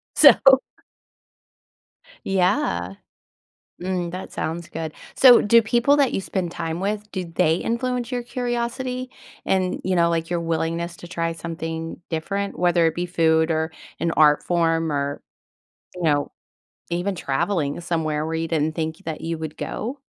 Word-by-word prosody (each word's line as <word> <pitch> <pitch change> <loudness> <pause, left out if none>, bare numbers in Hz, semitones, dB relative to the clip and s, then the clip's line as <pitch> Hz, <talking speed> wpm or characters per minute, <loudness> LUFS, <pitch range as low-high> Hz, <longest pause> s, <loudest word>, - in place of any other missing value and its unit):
So - - +9 2.0
Yeah. 180 - +1 0.9
Mm, 180 -2 -2
that 185 - -7
sounds 165 +1 -4
good. 160 -1 -5 0.2
So, 250 -3 +8
do 230 +3 +6
people 240 +6 +3
that 280 -3 +3
you - - 0
spend 185 -3 -3
time 165 0 -3
with 210 +1 -3
do 185 -2 -3
they 165 -1 +1
influence 245 +3 -2
your 245 -1 -1
curiosity 250 +1 -3 0.3
and, 185 -1 0
you 185 -1 +1
know, 170 0 +4
like, 165 0 -1
your 175 - 0
willingness 165 +1 -2
to 175 - -10
try 165 -1 -2
something 165 0 -5
different, 200 +5 -3
whether 175 -1 +3
it 160 - 0
be 175 +1 -2
food 160 -2 +2
or 160 0 0 0.3
an 170 - 0
art 150 -1 +5
form 165 -2 +1
or, 140 0 -2 0.8
you 180 - -6
know, 145 -2 +2 0.6
even 175 +3 -1
traveling 165 0 -1
somewhere 155 -3 -1
where 160 +1 -3
you 165 0 -2
didn't 155 -1 0
think 160 -1 -3
that 160 -2 -4
you 165 0 -3
would 155 -1 -6
go? 255 +6 -4
170 Hz, 150 wpm, -23 LUFS, 160-195 Hz, 2.0 s, So